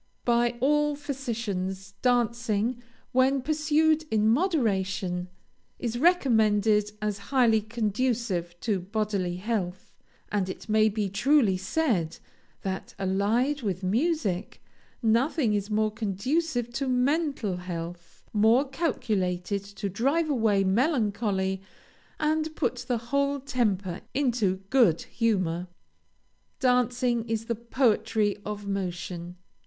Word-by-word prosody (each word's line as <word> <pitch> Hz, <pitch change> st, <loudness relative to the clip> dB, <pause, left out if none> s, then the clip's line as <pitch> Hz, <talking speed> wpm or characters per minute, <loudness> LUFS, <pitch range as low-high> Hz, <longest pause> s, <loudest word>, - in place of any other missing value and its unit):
By 240 Hz, 0 st, +2 dB
all 295 Hz, +2 st, +3 dB
physicians, 220 Hz, -9 st, -4 dB
dancing, 235 Hz, -1 st, +1 dB, 0.3 s
when 260 Hz, +1 st, +3 dB
pursued 310 Hz, +1 st, +2 dB
in 215 Hz, -1 st, +2 dB
moderation, 200 Hz, -, +1 dB, 0.5 s
is 240 Hz, -1 st, -3 dB
recommended 220 Hz, -, +3 dB
as 210 Hz, -1 st, -1 dB
highly 235 Hz, -5 st, +4 dB
conducive 215 Hz, -5 st, -1 dB
to 210 Hz, -5 st, 0 dB
bodily 195 Hz, -2 st, -2 dB
health; 185 Hz, -2 st, -3 dB, 0.4 s
and 200 Hz, -3 st, 0 dB
it -, -, -7 dB
may 215 Hz, 0 st, +4 dB
be 210 Hz, -1 st, -1 dB
truly 220 Hz, +1 st, +3 dB
said, 190 Hz, -, 0 dB, 0.5 s
that, 190 Hz, -1 st, -4 dB
allied 210 Hz, +9 st, +1 dB
with 195 Hz, -4 st, -3 dB
music, 215 Hz, -, -1 dB, 0.4 s
nothing 235 Hz, +2 st, +2 dB
is 205 Hz, 0 st, -1 dB
more 215 Hz, 0 st, +1 dB
conducive 240 Hz, -, -1 dB
to 270 Hz, +3 st, -2 dB
mental 260 Hz, -, +1 dB
health, 170 Hz, -1 st, -7 dB
more 225 Hz, +6 st, +4 dB
calculated 200 Hz, -, -1 dB
to 200 Hz, 0 st, -5 dB
drive 275 Hz, -, +1 dB
away 220 Hz, -6 st, +2 dB
melancholy, 205 Hz, -, +1 dB, 0.6 s
and 310 Hz, 0 st, 0 dB
put 250 Hz, 0 st, -1 dB
the 245 Hz, -, +1 dB
whole 280 Hz, 0 st, +1 dB
temper 210 Hz, -9 st, -1 dB
into 230 Hz, -9 st, +1 dB
good 235 Hz, -12 st, +4 dB
humor. 185 Hz, -7 st, 0 dB, 0.9 s
Dancing 250 Hz, -1 st, +2 dB
is 225 Hz, 0 st, -1 dB
the 235 Hz, -, -1 dB
poetry 225 Hz, -3 st, +1 dB
of 210 Hz, -1 st, -5 dB
motion. 180 Hz, -2 st, -4 dB
220 Hz, 105 wpm, -27 LUFS, 195-255 Hz, 0.9 s, highly